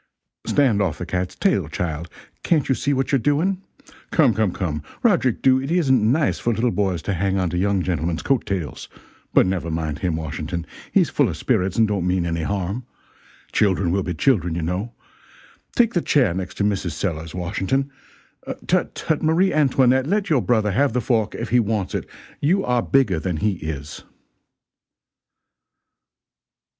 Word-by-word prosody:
] - - -47
stand 125 -8 +3
off 95 -6 0
the 90 - -5
cat's 90 0 -3
tail, - - +1
child, 85 0 -4 0.3
can't 155 -5 +1
you - - +5
see 140 +4 -1
what 135 -1 0
you're 135 - +3
doing? 165 - +1 0.5
Come, - - +4
come, 110 -4 +1
come, 80 -5 -3 0.2
Roderick 175 - +2
Dhu, 130 0 +4
it 135 - -5
isn't 130 -10 +3
nice 150 +1 +1
for 120 - 0
little 115 +2 +1
boys 95 -3 -1
to 100 - -1
hang 95 +2 0
onto 90 -2 -1
young 95 +1 +1
gentlemen's 85 -2 -2
coat 135 -5 +1
tails 95 -7 -4 0.4
but - - +5
never 90 -3 -2
mind 80 -3 -3
him, 90 -4 -1
Washington, 80 +2 -4 0.3
he's - - +3
full - - +2
of - - -5
spirits 95 0 0
and 110 -1 +4
don't 100 -4 -1
mean 90 -1 +1
any 85 -1 -1
harm. 100 +6 -2 0.7
Children 95 -4 +2
will 95 +2 +1
be 90 -2 -3
children, 90 - +1
you 85 - -2
know. 90 +8 -2 0.8
Take 235 -2 +3
the 175 - +1
chair 130 - +2
next 95 +1 -5
to - - -1
Mrs. 100 -5 0
Sellers, 80 -4 -4
Washington 95 +10 -1 0.7
tut, - - 0
tut, 155 - -1
Marie 165 +5 +2
Antoinette, 130 -3 +3
let 200 0 0
your 140 -5 +4
brother 110 0 +1
have 135 +4 +2
the 125 - +1
fork 110 -2 0
if - - -4
he 125 - +4
wants 105 -3 -1
it, - - -4 0.3
you 185 +7 +2
are 125 -1 +2
bigger 120 -12 +2
than 90 -1 -2
he 105 +7 +1
is." 75 -5 -6
100 Hz, 175 wpm, -22 LUFS, 90-130 Hz, 0.8 s, you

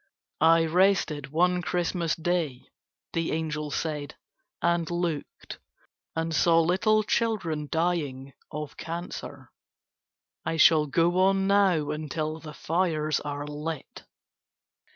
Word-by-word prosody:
"I 165 +1 +5
rested 170 -4 +2
one 180 +5 +2
Christmas 175 -1 -1
Day," 165 -6 -1 0.5
the 165 -1 -1
angel 150 -1 -2
said, 150 -1 -3 0.4
"and 170 -1 +1
looked 170 -4 -4 0.6
and 165 0 -1
saw 165 +1 +4
little 190 +6 +3
children 185 -10 -1
dying 150 -6 -1 0.2
of 150 -1 -6
cancer. 170 +2 -7 0.9
I 165 - -2
shall 155 -1 +6
go 170 +5 +2
on 195 +1 +3
now 195 -7 +3
until 155 +1 -3
the 150 -1 -10
fires 160 -3 0
are 145 0 -5
lit." 150 +1 -6
165 Hz, 110 wpm, -27 LUFS, 150-175 Hz, 0.9 s, shall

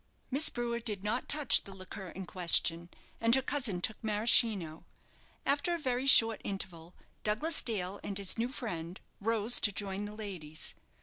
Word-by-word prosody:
Miss 285 +4 +2
Brewer 240 -1 -3
did 210 -4 -4
not 210 +2 -2
touch 280 -6 +3
the 195 - -11
liqueur 185 0 -8
in 190 +2 -7
question, 170 -1 +1 0.3
and 230 +1 +4
her 265 - +2
cousin 245 -10 -1
took 220 +5 -3
Maraschino. 210 -6 +3 0.6
After 285 +5 +1
a - - -3
very 260 -3 -2
short 225 -5 +8
interval, 180 -3 -6 0.3
Douglas 265 +10 +1
Dale 200 -4 -2
and 200 - -4
his 200 -2 0
new 235 +2 -1
friend 180 -9 -6 0.2
rose 225 +2 0
to 205 - +3
join 200 0 -4
the 210 0 -8
ladies. 180 -8 -6
210 Hz, 165 wpm, -32 LUFS, 185-240 Hz, 0.6 s, short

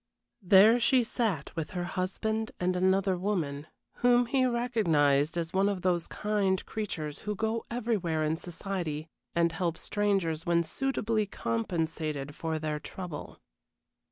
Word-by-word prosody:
There 200 +5 +7
she 250 +1 +4
sat 215 - -2
with 160 -3 -3
her 175 - -1
husband 220 +5 -2
and 180 0 +1
another 190 +1 +2
woman, 160 -7 -2 0.3
whom 245 0 +4
he 255 +1 +2
recognized 165 - +2
as 165 -1 -2
one 195 +2 +3
of 195 -3 -3
those 175 -2 +1
kind 205 -3 0
creatures 165 -9 -4
who 210 0 -3
go 220 +2 -1
everywhere 210 -10 0
in 155 +1 +1
society 170 -3 -4 0.3
and 170 0 +3
help 165 0 -1
strangers 195 -7 0
when 170 -1 +2
suitably 225 - -1
compensated 150 - -2
for 160 +1 -3
their 155 -1 -2
trouble. 175 -1 -7
185 Hz, 135 wpm, -29 LUFS, 160-215 Hz, 0.3 s, There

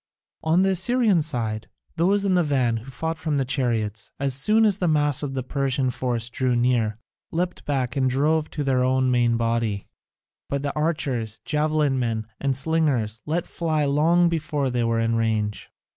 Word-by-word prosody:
On 165 +4 +3
the 195 - +3
Assyrian 205 0 +3
side, 115 -7 -3 0.3
those 195 +4 +2
in 195 - +2
the 180 - +4
van 130 -7 +1
who 115 +4 -9
fought 160 +5 -4
from 155 -2 -1
the 135 - 0
chariots, 115 -6 -2
as 135 -1 0
soon 215 - +4
as 205 -2 +2
the 180 - +1
mass 150 -3 +2
of 140 -2 -4
the 130 - -2
Persian 135 -1 0
force 120 -2 -2
drew 130 -1 0
near, 120 -3 +1 0.3
leapt 175 +2 -3
back 135 -3 -1
and 130 -2 +2
drove 150 +4 +1
to 150 - -3
their 130 -2 +1
own 130 0 +2
main 120 -1 +2
body; 115 -3 -1 0.6
but 140 0 -2
the 145 - -2
archers, 140 -8 -2
javelin 150 -3 +1
men, 115 -3 -1
and 135 -2 0
slingers, 135 -7 0
let 165 +3 -1
fly 155 -3 -1
long 165 +5 +3
before 155 -5 -1
they 120 -1 0
were 115 0 +1
in 115 0 +1
range. 110 -2 -1
135 Hz, 180 wpm, -24 LUFS, 120-160 Hz, 0.6 s, the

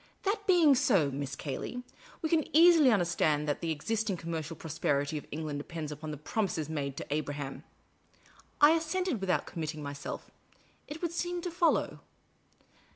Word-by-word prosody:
" - - -39
That 405 +1 -1
being 340 -6 +6
so, 190 - +3
Miss 140 0 -4
Cayley, 160 - -5 0.4
we 320 - 0
can 320 -1 +3
easily 330 -4 +7
understand 170 -7 +2
that 145 - -1
the 165 - -2
existing 205 +5 -1
commercial 165 -1 -4
prosperity 145 -2 -1
of 150 - -5
England 150 -1 -3
depends 155 0 -6
upon 150 +1 -6
the 150 - -5
promises 160 0 -2
made 140 -3 -3
to - - -5
Abraham." 145 -2 -4 1.0
1 295 +1 +9
assented, 330 - -1
without 190 -2 +1
committing 155 -3 -5
myself: 140 0 -6 0.3
" - - -34
It 305 +4 -8
would 340 - 0
seem 350 +1 -2
to 355 - -3
follow." 340 -1 +1
165 Hz, 160 wpm, -31 LUFS, -, 1.0 s, 1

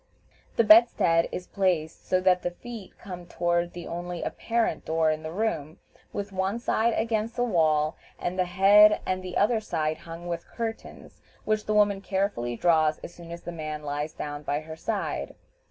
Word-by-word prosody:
The 230 - +4
bedstead 215 -7 +5
is 180 - -5
placed 180 -5 -1
so 185 - +3
that 180 -1 +3
the 175 - -1
feet 220 +2 -10
come 180 -3 -9
toward 175 0 0
the 175 -1 -7
only 175 0 -5
apparent 230 -8 -1
door 160 0 +2
in 155 0 -3
the 155 0 -6
room, 165 -6 -2 0.3
with 205 0 -4
one 190 +3 -1
side 235 -1 +1
against 225 0 -1
the 245 - +1
wall, 155 -8 +2 0.2
and 175 - -2
the 185 - +3
head 200 +4 +6
and 185 0 -2
other 220 +2 +3
side 155 -6 -2
hung 165 +1 -9
with 170 -1 -4
curtains, 225 -1 -7 0.2
which 215 0 0
the 215 - +1
woman 205 -2 +3
carefully 190 - -1
draws 155 +1 +3
as - - -8
soon 170 -1 -12
as 170 0 -8
the 175 - -5
man 155 -2 -5
lies 145 +1 -3
down 145 0 -5
by 145 0 -2
her 160 0 -8
side. 200 +5 -3
175 Hz, 180 wpm, -27 LUFS, 160-210 Hz, 0.3 s, head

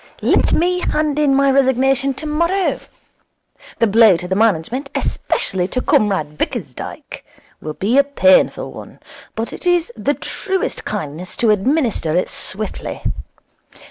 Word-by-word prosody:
Let - - +3
me 360 +2 +2
hand 300 -3 -1
in 285 -2 +3
my 275 0 +3
resignation 270 0 +2
tomorrow. 335 +6 0 1.0
The 230 - +3
blow 215 -3 +5
to 180 - -5
the 190 - -1
management, 225 - 0
especially 180 -3 -1
to 255 - -2
Comrade 155 -8 +1
Bickersdyke, - - -5 0.4
will 155 0 -6
be 230 +8 +2
a - - +6
painful 280 0 +2
one, - - -11 0.4
but 225 +1 -4
it - - -6
is 350 -7 +2
the 255 +7 -1
truest 385 -1 -3
kindness 180 -3 -5
to 230 -2 +3
administer 210 - 0
it 180 - +1
swiftly. 205 +2 -4
255 Hz, 135 wpm, -18 LUFS, 195-285 Hz, 1.0 s, a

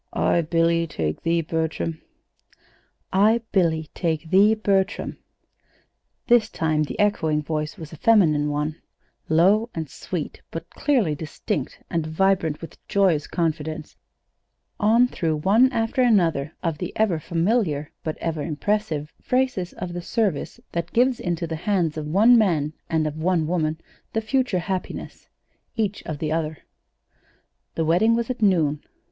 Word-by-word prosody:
"I, 170 - +2
Billy, 165 +1 +1
take 80 - -3
thee, 165 0 +1
Bertram." 160 0 -2 1.1
"'I, 215 +5 +4
Billy, 160 -5 +1
take 160 -1 -2
thee, 205 +3 +6
Bertram.'" 200 -1 0 1.1
This 235 -2 +4
time 155 -1 0
the - - -7
echoing 160 -7 +1
voice 155 +3 -3
was 160 -3 -9
a - - -9
feminine 155 -9 +4
one, 150 +2 -2 0.5
low 195 +9 +4
and 160 -2 -3
sweet, 160 +3 -6
but 165 +1 -6
clearly 245 - +1
distinct, 145 -2 -4
and 165 -2 -1
vibrant 165 -2 +1
with 165 - -10
joyous 185 -7 +2
confidence, 160 -2 -3 0.8
on 230 +4 +4
through 165 -9 -1
one 215 +12 +4
after 230 +2 0
another 170 - +2
of 165 -3 -1
the 180 - -4
ever 205 -7 +1
familiar, 165 -3 0
but 155 - -3
ever 160 -2 -3
impressive 155 -1 -2
phrases 250 -8 0
of 180 -1 -6
the 175 - -4
service 195 -5 -1
that 170 0 -4
gives 250 +1 +3
into 175 -1 -2
the 160 -1 -4
hands 175 -6 +1
of 155 -1 -4
one 220 +9 +6
man 155 -8 +1 0.2
and 160 -1 +1
of 155 0 -3
one 170 -2 +2
woman 160 -1 -1 0.3
the 225 - 0
future 255 -2 0
happiness, 190 -2 -5 0.5
each 210 -3 -1
of 155 - -3
the 155 +1 -3
other. 160 -1 -1 1.2
The 165 - 0
wedding 210 +8 +4
was 235 +1 -1
at 245 - -6
noon. 160 -8 +2
170 Hz, 145 wpm, -23 LUFS, 155-210 Hz, 1.2 s, thee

